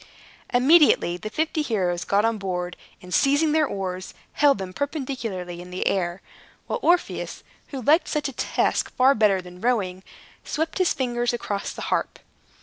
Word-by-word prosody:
Immediately 260 - +5
the 215 - -6
fifty 315 +6 -1
heroes 185 -10 -1
got 205 +2 +2
on 225 -1 0
board, 180 -2 -3 0.3
and 180 0 -8
seizing 290 +3 +3
their 310 -1 +3
oars, 185 -3 -5 0.2
held 285 -4 +4
them 190 -2 -6
perpendicularly 240 - -4
in 180 - -11
the 180 +1 -3
air, 175 -1 -1 0.4
while - - -3
Orpheus 350 -1 0 0.2
(who 265 -3 -6
liked 310 +8 +4
such 300 -2 -1
a 275 - -6
task - - 0
far 260 +1 +5
better 205 -6 +2
than 180 0 -12
rowing) 200 -7 0 0.4
swept 320 +4 -2
his 370 - +3
fingers 240 -2 -1
across 205 -4 -3
the - - -7
harp. - - -1
225 Hz, 160 wpm, -24 LUFS, 185-285 Hz, 0.4 s, Immediately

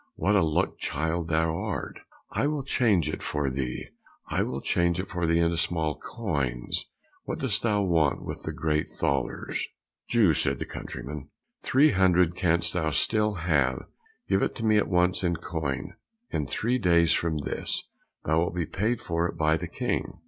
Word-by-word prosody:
what 105 +2 +2
a 100 - +5
luck 80 -2 0
child 80 +1 -1
thou 80 0 +1
art! 100 +2 -4 0.3
I 140 - +1
will 150 -2 -1
change 110 - +2
it 75 - -3
for 75 -3 -1
thee, 65 -1 -3 0.4
I - - 0
will 65 - -2
change 85 +4 +1
it 95 - -3
for 90 -2 -2
thee 85 0 +3
into 85 0 +2
small 80 -3 0
coins, 70 - -2 0.4
what - - -3
dost - - +1
thou 105 -3 +2
want 80 -6 +2
with - - -5
the - - -4
great 75 -1 -1
thalers?" 70 -2 -2 0.4
"Jew," 110 -9 +4
said - - +2
the - - -4
countryman, 70 +3 -7 0.3
"three 145 +3 +4
hundred 90 -3 +4
canst 85 -2 +2
thou 80 -3 0
still 105 +8 +2
have; 70 -7 +1 0.4
give 95 0 +2
it - - 0
to 115 - -3
me 110 -1 +4
at 105 - +2
once 90 +1 +2
in 85 -1 +2
coin, 75 -6 -3 0.4
in 75 - -1
three 120 - 0
days 85 -5 +4
from 80 -2 0
this, 75 - -2 0.4
thou 80 +1 +3
wilt 85 0 -1
be 85 -2 0
paid 110 +8 -1
for 85 -4 0
it - - -7
by 80 0 +3
the 80 - -4
King." - - -2
85 Hz, 180 wpm, -27 LUFS, 75-95 Hz, 0.4 s, a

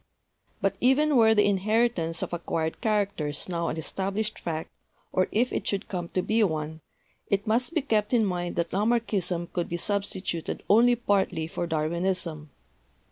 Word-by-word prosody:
"But - - 0
even 290 +4 +4
were 220 -2 +6
the 205 -1 +5
inheritance 200 -4 +1
of - - -5
acquired 160 -1 -2
characters 200 -9 0
now 170 -2 -2
an 155 - -2
established 195 +6 -3
fact, 160 -1 -4 0.4
or 185 - +2
if 240 +4 +1
it - - -2
should 200 0 -2
come 175 -3 -4
to 185 - +2
be 220 +1 +2
one, 160 -3 -2 0.5
it 200 0 0
must 245 +9 +1
be 315 - +2
kept 215 -6 +1
in 235 -4 +4
mind 175 -2 -2
that 170 -1 -1
Lamarckism 200 -5 0
could 175 -2 -2
be 170 - -2
sub 200 +3 +1
stituted 185 -4 -4
only 240 +4 +6
partly 200 -8 0
for 170 +1 -4
Darwinism. 165 0 -1
190 Hz, 165 wpm, -27 LUFS, 170-220 Hz, 0.5 s, were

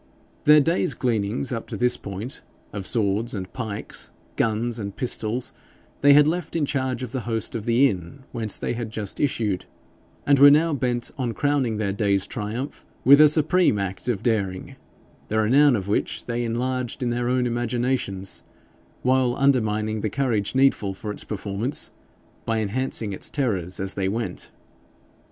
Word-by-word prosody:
Their 150 +1 +8
day's 165 -3 +1
gleanings 115 +2 -1
up 115 - -4
to - - -5
this 125 0 +3
point 100 +7 -7 0.3
of 100 -2 -4
swords 110 +1 0
and 95 -2 -6
pikes, 110 -5 -5 0.2
guns 115 +1 0
and 100 -2 -5
pistols, 120 -1 -2 0.5
they 140 0 +7
had 145 0 +7
left 175 +3 -2
in 160 -3 +1
charge 130 -2 -2
of 125 - -5
the 130 - -2
host 115 -1 -1
of 115 -3 -4
the 120 +4 +4
inn 100 +6 -6
whence 110 -3 -1
they - - -2
had 120 -2 -4
just 105 -2 -4
issued, 110 -9 0 0.6
and 140 -2 +4
were 145 +1 +10
now 155 +3 +4
bent 125 -3 -1
on 120 -3 -2
crowning 140 -6 +1
their 100 -2 -1
day's 100 -1 +1
triumph 115 +6 -5 0.2
with 140 +3 +8
a 155 - +9
supreme 155 - +3
act 100 +3 -4
of 110 -4 -1
daring 100 -6 -1 0.5
the 110 - -1
renown 130 +5 +5
of 100 -3 -3
which 100 - -1
they 120 0 -2
enlarged 125 +2 -2
in 120 - 0
their 120 0 -1
own 125 0 +1
imaginations, 120 -5 -2 0.6
while 130 -1 +2
undermining 110 -5 +1
the 110 - -1
courage 115 -3 -1
needful 130 -8 +2
for 105 +2 -5
its - - -6
performance, 105 +5 -2 0.5
by 115 0 -1
enhancing 110 0 -1
its - - -5
terrors 95 - -1
as 95 0 -1
they 95 -1 -1
went. 110 -3 -4
120 Hz, 165 wpm, -24 LUFS, 105-130 Hz, 0.6 s, were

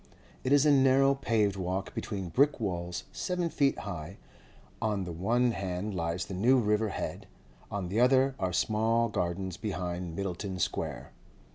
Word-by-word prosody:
It 130 - -1
is 145 0 +5
a 150 - +6
narrow 135 0 +5
paved 110 -7 +1
walk 95 +1 -3
between 95 -4 -4
brick 140 - +3
walls 90 -4 -3
seven 180 -2 -2
feet 140 -2 +2
high; 85 +3 -6 0.6
on 105 -3 0
the 90 - -5
one 120 +9 +1
hand 95 0 -3
lies 85 0 -2
the 100 - -7
New 120 +8 +4
River 105 -2 +2
Head, - - -5 0.4
on 100 -3 -3
the 105 +5 0
other 130 +2 +4
are 95 -1 0
small 115 +4 +2
gardens 90 -1 -2
behind 90 -5 -4
Myddelton 95 0 -3
Square. - - -3
100 Hz, 155 wpm, -30 LUFS, 90-125 Hz, 0.6 s, a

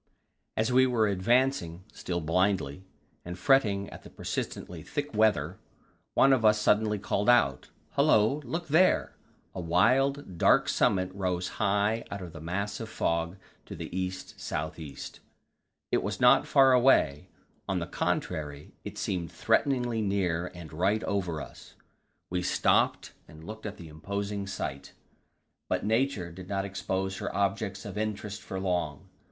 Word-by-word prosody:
As 110 +2 +1
we 130 +1 +5
were 115 -4 +2
advancing, 100 -3 +1
still 85 -1 -3
blindly, 90 -1 0 0.4
and 90 +1 -7
fretting 100 -4 +3
at - - -10
the - - -13
persistently 85 -2 -5
thick 145 - -4
weather, 95 -6 +2 0.6
one 135 0 +6
of 125 -4 +2
us 105 0 +5
suddenly 105 0 +2
called 100 +2 0
out: 70 - +3 0.2
"Hullo, 110 +8 +3
look 165 +7 -4
there!" 170 +6 +3 0.4
A 95 - -5
wild, 115 - +2
dark - - +5
summit 95 -1 +2
rose 90 -2 -1
high 105 +2 +2
out 100 -2 -5
of 85 -3 -9
the 80 - -9
mass 100 +5 -3
of 115 -1 -6
fog 85 0 -1 0.3
to - - -7
the - - -7
east 95 0 -4
south 80 +2 -4
east. 75 -3 -8 0.7
It - - +2
was - - -3
not - - +5
far 135 -1 +6
away 120 - +3 0.4
on - - +1
the - - -2
contrary, 75 -2 -3
it - - -8
seemed 85 -4 -2
threateningly 120 -5 +1
near 90 -4 0
and 85 -3 -10
right 95 +7 +1
over 90 -6 -1
us. - - -11 0.6
We 90 0 0
stopped 90 +1 +2 0.2
and 80 +1 -13
looked 110 +3 -7
at 105 0 -7
the 85 - -10
imposing 100 +5 -4
sight, 70 -8 -5 0.8
but - - -1
Nature 110 -5 0
did 90 +2 -10
not 100 -1 -1
expose 95 0 -3
her - - -4
objects 100 0 -1
of 105 0 -5
interest 105 -1 -4
for 95 - -5
long. 90 -6 -2
100 Hz, 150 wpm, -29 LUFS, 90-110 Hz, 0.8 s, one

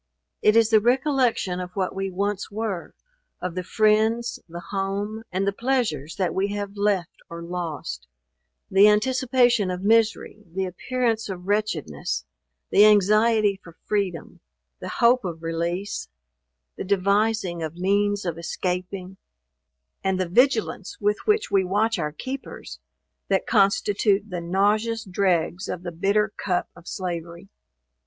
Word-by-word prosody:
It 210 - +4
is 225 -1 +4
the 220 - +7
recollection 245 -6 +1
of 180 0 -7
what 190 -2 -1
we 195 0 -3
once 200 +2 -2
were, 210 -4 -4 0.4
of 180 -1 -4
the 185 - -3
friends, 220 +4 +2
the 170 +1 -7
home, 200 +2 -2
and 190 +2 0
the 200 - 0
pleasures 215 - -1
that 185 -3 -1
we 195 +1 +1
have 205 0 -4
left 200 -4 -1
or 170 0 -7
lost; 165 - -5 0.6
the 195 +2 +7
anticipation 245 -1 +3
of 180 +1 -4
misery, 220 0 +2
the 190 0 0
appearance 225 +4 -1
of 180 -2 -6
wretchedness, 150 - -2 0.5
the 205 - +7
anxiety 215 0 +4
for 165 -2 -14
freedom, 195 -6 -2 0.4
the - - -6
hope 240 +1 +3
of 170 -3 -5
release, 170 - -3 0.7
the - - -4
devising 200 -1 +1
of 160 0 -4
means 200 +2 +1
of 170 -2 -3
escaping, 180 +2 -4 0.9
and 190 -1 0
the 185 - 0
vigilance 225 -1 +1
with 210 0 +1
which 425 - +2
we 195 -1 +4
watch 205 +3 +1
our 150 -2 -1
keepers, 260 - -7 0.5
that 195 -1 +1
constitute 200 0 +2
the 175 -1 -3
nauseous 210 +6 +1
dregs 185 -2 0
of 180 - -4
the 175 - -4
bitter 200 +5 +1
cup 180 -3 -1
of 175 - -16
slavery. 170 0 -5
200 Hz, 140 wpm, -24 LUFS, 180-215 Hz, 0.9 s, the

